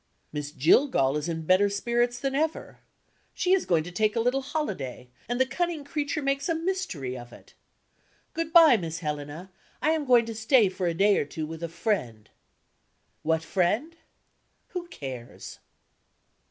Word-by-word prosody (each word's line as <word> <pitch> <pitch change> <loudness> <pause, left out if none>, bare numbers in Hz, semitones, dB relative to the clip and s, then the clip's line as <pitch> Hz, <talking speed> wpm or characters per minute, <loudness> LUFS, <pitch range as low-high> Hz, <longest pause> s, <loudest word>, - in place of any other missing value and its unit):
Miss 145 -1 -4
Jillgall 150 - +3
is 150 +3 -2
in 160 -1 -4
better 185 +4 +4
spirits 240 +4 0
than 275 -1 -2
ever. 310 +3 -2 0.6
She 370 0 +2
is 385 - +2
going 165 -3 +2
to 180 - -8
take 210 +4 +1
a - - +1
little 250 +4 +1
holiday; 200 - -4 0.2
and 245 +1 -1
the 260 - +5
cunning 320 +3 -2
creature 290 +1 -2
makes 275 +3 0
a 330 - +2
mystery 325 - -3
of 120 -1 -9
it. - - -16 0.8
"Good 330 -1 -3
by, 325 -8 +8
Miss 165 -3 -5
Helena. 150 +4 -5 0.3
I 310 - +2
am 315 -2 0
going 245 -3 +5
to 225 - -5
stay 220 -1 +4
for 185 -1 -3
a 170 - -1
day 200 +3 +4
or - - -1
two 155 +2 -5
with 160 +1 -8
a 170 - -3
friend." 140 - -2 0.9
What 160 0 0
friend? 205 - 0 0.7
Who 355 -1 -5
cares? 130 - -8
210 Hz, 165 wpm, -27 LUFS, -, 0.9 s, by